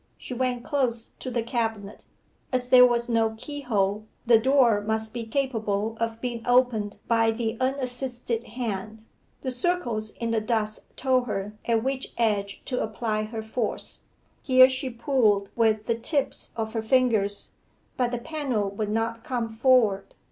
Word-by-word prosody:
She -, -, -7 dB
went 250 Hz, -1 st, -1 dB
close 245 Hz, -5 st, -1 dB
to 255 Hz, -, -5 dB
the 235 Hz, -2 st, -1 dB
cabinet. 225 Hz, -4 st, -3 dB, 0.5 s
As 250 Hz, -1 st, 0 dB
there 250 Hz, 0 st, +9 dB
was 240 Hz, 0 st, 0 dB
no 225 Hz, -2 st, +1 dB
keyhole, 220 Hz, -7 st, -2 dB, 0.2 s
the 230 Hz, -2 st, +6 dB
door 245 Hz, -4 st, +4 dB
must 220 Hz, +1 st, -2 dB
be 235 Hz, -2 st, -5 dB
capable 220 Hz, -4 st, -1 dB
of 230 Hz, 0 st, -2 dB
being 240 Hz, -1 st, -4 dB
opened 245 Hz, -5 st, +2 dB
by 230 Hz, -1 st, +3 dB
the 225 Hz, 0 st, -1 dB
unassisted 250 Hz, -3 st, -2 dB
hand. 220 Hz, -3 st, -5 dB, 0.4 s
The 260 Hz, -, -2 dB
circles 245 Hz, -6 st, 0 dB
in 230 Hz, +1 st, -4 dB
the 225 Hz, -1 st, +1 dB
dust 215 Hz, -1 st, -2 dB
told 255 Hz, -2 st, +2 dB
her 205 Hz, -1 st, -3 dB
at 230 Hz, -1 st, +1 dB
which 265 Hz, 0 st, -3 dB
edge 205 Hz, -4 st, 0 dB
to 250 Hz, -, -2 dB
apply 215 Hz, -1 st, -1 dB
her 220 Hz, 0 st, -6 dB
force. 220 Hz, 0 st, -3 dB, 0.4 s
Here 255 Hz, -1 st, +7 dB
she 260 Hz, 0 st, -2 dB
pulled 230 Hz, -5 st, +1 dB
with 220 Hz, -2 st, +2 dB
the 230 Hz, 0 st, -1 dB
tips 280 Hz, +4 st, -1 dB
of 220 Hz, -1 st, -3 dB
her 225 Hz, -, -1 dB
fingers, 220 Hz, -4 st, +2 dB, 0.4 s
but 250 Hz, -2 st, +1 dB
the 245 Hz, -, -2 dB
panel 240 Hz, -7 st, -2 dB
would 205 Hz, +1 st, -3 dB
not 225 Hz, +1 st, -1 dB
come 240 Hz, -3 st, -2 dB
forward. 225 Hz, -4 st, +2 dB
230 Hz, 155 wpm, -26 LUFS, 220-250 Hz, 0.5 s, there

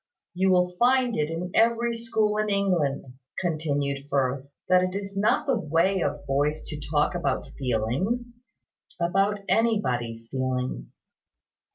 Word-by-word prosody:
"You 190 Hz, +2 st, +2 dB
will 180 Hz, -1 st, +3 dB
find 250 Hz, -1 st, +3 dB
it 150 Hz, 0 st, 0 dB
in 170 Hz, +2 st, -4 dB
every 235 Hz, +1 st, +2 dB
school 220 Hz, -2 st, 0 dB
in 215 Hz, 0 st, 0 dB
England," 180 Hz, -9 st, +1 dB, 0.3 s
continued 145 Hz, -5 st, -1 dB
Firth, 135 Hz, 0 st, 0 dB, 0.2 s
"that 180 Hz, 0 st, +5 dB
it 185 Hz, +1 st, -1 dB
is 200 Hz, 0 st, -5 dB
not 205 Hz, +2 st, +2 dB
the 265 Hz, -5 st, +1 dB
way 170 Hz, +3 st, +1 dB
of 145 Hz, -1 st, -2 dB
boys 145 Hz, +3 st, 0 dB
to 150 Hz, -, -6 dB
talk 150 Hz, +2 st, +2 dB
about 145 Hz, -7 st, -1 dB
feelings 140 Hz, -, -1 dB, 0.7 s
about 195 Hz, +4 st, +1 dB
anybody's 125 Hz, -, 0 dB
feelings. 130 Hz, -, -3 dB
175 Hz, 135 wpm, -26 LUFS, 140-205 Hz, 0.7 s, that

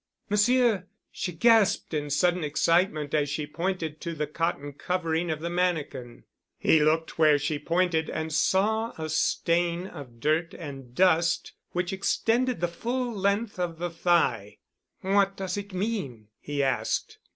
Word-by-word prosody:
"Monsieur!" 215 Hz, -2 st, +3 dB, 0.2 s
she 180 Hz, -, -4 dB
gasped 215 Hz, +2 st, +3 dB
in 150 Hz, -1 st, -2 dB
sudden 175 Hz, +4 st, +2 dB
excitement 155 Hz, 0 st, +1 dB
as 145 Hz, -2 st, +1 dB
she 150 Hz, +1 st, -2 dB
pointed 165 Hz, -1 st, -3 dB
to 170 Hz, -1 st, -4 dB
the 150 Hz, -1 st, -1 dB
cotton 150 Hz, -2 st, -3 dB
covering 170 Hz, +1 st, -1 dB
of 155 Hz, -1 st, -2 dB
the 170 Hz, -, -3 dB
mannikin. 150 Hz, -9 st, -2 dB, 0.3 s
He 160 Hz, -, +4 dB
looked 160 Hz, +2 st, +1 dB
where 155 Hz, -2 st, +6 dB
she 145 Hz, +1 st, -2 dB
pointed 170 Hz, 0 st, +1 dB
and 160 Hz, 0 st, -3 dB
saw 220 Hz, +8 st, +1 dB
a 160 Hz, -1 st, -4 dB
stain 170 Hz, +2 st, +1 dB
of 125 Hz, -10 st, -10 dB
dirt 155 Hz, +5 st, 0 dB
and 135 Hz, -6 st, -9 dB
dust 170 Hz, -2 st, +2 dB, 0.2 s
which 180 Hz, +1 st, -1 dB
extended 230 Hz, +3 st, 0 dB
the 175 Hz, -, +2 dB
full 240 Hz, +7 st, -3 dB
length 200 Hz, +1 st, -1 dB
of 170 Hz, -2 st, -2 dB
the 175 Hz, +1 st, -3 dB
thigh. 165 Hz, -, +1 dB, 0.4 s
"What 195 Hz, 0 st, +2 dB
does 190 Hz, -2 st, -3 dB
it 200 Hz, 0 st, -6 dB
mean?" 180 Hz, -, -3 dB
he 145 Hz, -1 st, -2 dB
asked. 125 Hz, -5 st, -1 dB
170 Hz, 150 wpm, -27 LUFS, 150-190 Hz, 0.4 s, where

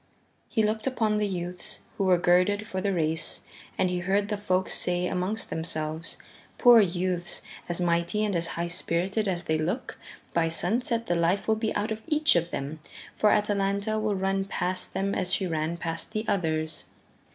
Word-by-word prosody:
He 220 Hz, -, +1 dB
looked 215 Hz, +2 st, 0 dB
upon 220 Hz, -5 st, +1 dB
the 210 Hz, 0 st, +1 dB
youths 180 Hz, -1 st, -4 dB
who 195 Hz, -, 0 dB
were 185 Hz, -1 st, +5 dB
girded 180 Hz, +4 st, +3 dB
for 190 Hz, -3 st, -4 dB
the 200 Hz, +1 st, +1 dB
race, 160 Hz, -3 st, -1 dB, 0.3 s
and 185 Hz, -, +3 dB
he 180 Hz, -, -1 dB
heard 195 Hz, +3 st, +1 dB
the 210 Hz, -, 0 dB
folk 190 Hz, -2 st, 0 dB
say 180 Hz, 0 st, +1 dB
amongst 185 Hz, +4 st, -2 dB
themselves, 160 Hz, 0 st, -2 dB, 0.4 s
"Poor 240 Hz, -2 st, +8 dB
youths, 180 Hz, -2 st, 0 dB, 0.3 s
as 175 Hz, -, -1 dB
mighty 170 Hz, +4 st, +1 dB
and 205 Hz, -3 st, -1 dB
as 170 Hz, 0 st, 0 dB
high 170 Hz, -, 0 dB
spirited 185 Hz, +5 st, 0 dB
as 180 Hz, -2 st, -1 dB
they 155 Hz, -1 st, 0 dB
look, 175 Hz, +11 st, -3 dB, 0.3 s
by 165 Hz, -1 st, +2 dB
sunset 230 Hz, +7 st, 0 dB
the 175 Hz, -, 0 dB
life 170 Hz, +3 st, +1 dB
will 220 Hz, -, +4 dB
be 220 Hz, 0 st, -1 dB
out 210 Hz, +2 st, -1 dB
of 220 Hz, 0 st, -3 dB
each 305 Hz, -1 st, +4 dB
of 170 Hz, 0 st, +1 dB
them, 145 Hz, +2 st, -4 dB, 0.4 s
for 210 Hz, -, +4 dB
Atalanta 205 Hz, +1 st, +1 dB
will 215 Hz, -1 st, 0 dB
run 195 Hz, 0 st, 0 dB
past 185 Hz, -1 st, -2 dB
them 200 Hz, +1 st, 0 dB
as 180 Hz, -, -1 dB
she 190 Hz, -, +3 dB
ran 160 Hz, 0 st, -1 dB
past 165 Hz, -1 st, -4 dB
the 215 Hz, +1 st, -2 dB
others." 160 Hz, -4 st, 0 dB
185 Hz, 185 wpm, -27 LUFS, 170-210 Hz, 0.4 s, Poor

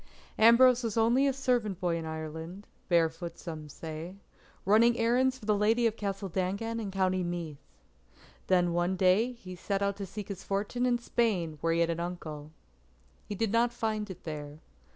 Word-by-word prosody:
Ambrose 240 Hz, +2 st, +7 dB
was 230 Hz, -2 st, -3 dB
only 240 Hz, +5 st, +4 dB
a -, -, +3 dB
servant 245 Hz, -8 st, 0 dB
boy 175 Hz, -2 st, 0 dB
in 165 Hz, -1 st, -4 dB
Ireland, 160 Hz, +5 st, -6 dB, 0.2 s
barefoot 170 Hz, 0 st, +1 dB
some 155 Hz, -4 st, -7 dB
say, 160 Hz, +4 st, -7 dB, 0.5 s
running 230 Hz, +4 st, +5 dB
errands 255 Hz, +3 st, +2 dB
for 235 Hz, -, -13 dB
the 215 Hz, -, +3 dB
Lady 220 Hz, +4 st, +2 dB
of 225 Hz, -1 st, +2 dB
Castle 195 Hz, -2 st, -3 dB
Dangan 195 Hz, +6 st, -2 dB
in 210 Hz, -3 st, -4 dB
County 185 Hz, -1 st, 0 dB
Meath. 170 Hz, -4 st, -5 dB, 0.9 s
Then 175 Hz, -2 st, +3 dB
one 175 Hz, +2 st, +1 dB
day 190 Hz, +6 st, +3 dB
he 190 Hz, -7 st, -10 dB
set 195 Hz, +2 st, -2 dB
out 200 Hz, 0 st, 0 dB
to 200 Hz, -1 st, -5 dB
seek 200 Hz, +2 st, -7 dB
his 200 Hz, -, -6 dB
fortune 210 Hz, +5 st, -1 dB
in 245 Hz, -1 st, +2 dB
Spain 200 Hz, -10 st, -1 dB
where 165 Hz, -, +1 dB
he 170 Hz, -, +2 dB
had 170 Hz, 0 st, +2 dB
an 165 Hz, -, -3 dB
uncle. 160 Hz, -4 st, -6 dB, 0.8 s
He 205 Hz, -, -4 dB
did 220 Hz, 0 st, -1 dB
not 235 Hz, +1 st, +3 dB
find 220 Hz, -3 st, -2 dB
it 190 Hz, -, -9 dB
there. 150 Hz, -2 st, -6 dB
195 Hz, 180 wpm, -30 LUFS, 170-230 Hz, 0.9 s, Ambrose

